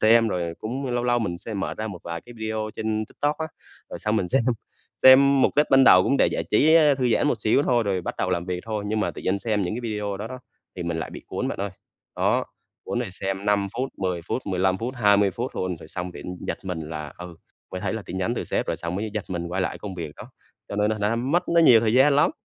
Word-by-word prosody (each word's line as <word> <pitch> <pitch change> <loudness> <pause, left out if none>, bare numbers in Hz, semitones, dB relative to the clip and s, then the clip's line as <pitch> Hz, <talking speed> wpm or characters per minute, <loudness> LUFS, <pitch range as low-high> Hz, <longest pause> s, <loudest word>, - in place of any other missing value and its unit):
xem, 115 +1 +5
rồi 85 -4 -2
cũng 130 +5 -4
lâu 120 0 -1
lâu 120 0 +2
mình 90 -6 -3
sẽ 110 +4 -7
mở 100 - -2
ra 110 - -4
một 95 -5 -6
vài 85 -1 -5
cái 120 - -13
video 110 -1 -3
trên 110 0 -1
TikTok 145 +1 -2
á, 160 - -2 0.4
rồi - - -6
xong 105 +1 0
mình 90 -4 0
xem. 130 +2 +2 0.6
Xem 135 +1 +7
mục - - +2
đích 150 - +4
ban 135 0 +7
đầu 90 -6 +8
cũng 140 - +2
để - - +4
giải - - -2
trí, 155 +9 +5
ơ, 150 -3 +6
thư 130 -2 0
giãn 120 - +2
một 125 - +1
xíu 110 +6 +2
thôi, 120 -4 +2
rồi 100 -3 -1
bắt - - -4
đầu 95 - 0
làm 85 -1 0
việc 90 -1 -3
thôi 105 -2 -3
nhưng 110 +1 0
mà - - 0
tự - - -10
nhiên 95 +2 0
xem 105 -1 0
những 90 +4 -2
cái 120 - -4
video 105 -2 -3
đó 105 - -5
đó, 130 +2 -7 0.4
thì 90 - -4
mình 85 -1 -2
lại - - -4
bị - - -9
cuốn - - -3
bạn - - -4
ơi. 100 - -2 0.5
Đó, - - +2 0.4
cuốn 120 - -2
rồi 120 -6 -3
xem 95 0 -4
5 100 -1 +2
phút, 130 +1 -1
10 90 -2 -1
phút, 125 - -3
15 95 -1 +1
phút, 120 +3 -4
20 100 -3 +4
phút 120 +6 -5
luôn, 90 -1 -2
rồi 80 - -13
xong 90 +2 -5
bị, - - -10
ưm, 90 - -5
giật - - -3
mình 90 -3 -3
là, 75 -2 -6
ừ, 90 -2 -9 0.4
mới 90 - -4
thấy - - -2
là 110 - -4
tin 95 +2 -5
nhắn 110 +6 0
từ - - -3
sếp, - - -1
rồi - - -1
xong 85 0 -4
mới 105 +3 -3
giật 105 -2 -2
mình 85 -2 -3
quay 95 +2 -2
lại - - -3
công 100 -2 -7
việc 80 -4 -6
đó. - - -11 0.4
Cho 100 - -5
nên 105 +1 +2
thành 110 -1 -2
ra 105 +3 +1
mất 145 +10 0
nó 170 0 +4
nhiều 120 -8 +7
thời 110 -1 +1
gian 140 +2 +5
lắm. 145 - +4
105 Hz, 285 wpm, -24 LUFS, 95-120 Hz, 0.6 s, đầu